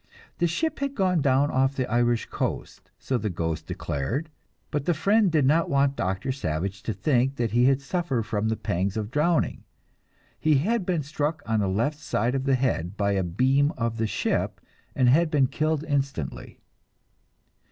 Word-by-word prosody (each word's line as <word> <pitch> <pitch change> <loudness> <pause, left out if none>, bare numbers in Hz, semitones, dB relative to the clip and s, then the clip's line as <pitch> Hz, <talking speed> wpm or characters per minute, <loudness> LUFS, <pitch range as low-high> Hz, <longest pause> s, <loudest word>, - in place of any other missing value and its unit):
The 175 - +3
ship 315 - -1
had 280 0 -2
gone 185 -4 +2
down 140 +1 +3
off 135 +1 +2
the 130 - 0
Irish 120 0 +1
coast, - - -4
so 130 -2 -2
the 105 - -2
ghost 80 -3 -3
declared, 130 - -3 0.4
but 145 -2 -2
the 175 - +2
friend 200 +4 +3
did 155 -4 +3
not 160 +5 +3
want 140 0 +2
Doctor 95 +7 -2
Savage 95 - -3
to 110 - -3
think 130 +6 +1
that 120 -4 -1
he 120 +2 +3
had 135 +1 +3
suffered 140 -5 -1
from 105 0 -1
the 110 - -1
pangs 95 +4 -1
of 105 0 -3
drowning; 155 +4 +1 0.8
he 155 -1 +3
had 195 +8 +1
been 170 -5 0
struck 150 +2 -2
on 110 -1 +1
the 100 - +1
left 115 +11 0
side 120 -3 -1
of 135 -1 -1
the 135 -1 +3
head 105 -8 -1
by 100 -1 +1
a 100 -1 +1
beam 130 - +2
of 115 -2 -1
the 110 -1 0
ship - - -1 0.4
and 130 - +3
had 155 +6 +4
been 145 -4 +3
killed 155 +3 -1
instantly. 140 - -3
135 Hz, 185 wpm, -26 LUFS, 110-150 Hz, 0.8 s, had